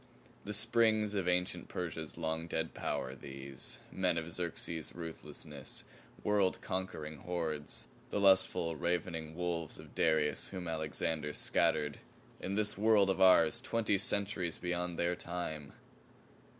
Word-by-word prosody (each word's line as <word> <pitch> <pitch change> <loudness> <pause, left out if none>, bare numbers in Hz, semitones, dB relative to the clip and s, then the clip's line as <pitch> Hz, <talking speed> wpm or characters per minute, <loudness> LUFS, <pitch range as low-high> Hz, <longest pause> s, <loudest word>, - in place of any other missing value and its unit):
The 105 - -3
springs 110 -1 +4
of 95 -3 0
ancient 90 0 0
Persia's 80 -3 -4
long 80 0 -1
dead 80 -1 -2
power, 65 - -2
these. 70 0 -6
Men 90 -3 +1
of 85 0 -3
Xerxes's 85 -2 -3
ruthless, 80 -2 -6 0.4
world 100 -3 +2
conquering 80 -5 -4
hordes; 80 -3 -3 0.2
the - - -1
lustful, 95 -4 +4
ravening 85 -1 -1
wolves 85 -2 -2
of - - -12
Darius 80 -2 +2
whom 90 -3 -5
Alexander 80 -1 -1
scattered 75 -1 +2 0.4
in 95 - -3
this 105 0 +2
world 105 -2 +5
of - - -1
ours 95 +5 +7
twenty 115 -6 +1
centuries 100 -4 0
beyond 90 -1 -2
their 85 +1 +1
time! 85 -5 -4
85 Hz, 125 wpm, -34 LUFS, 80-95 Hz, 0.4 s, ours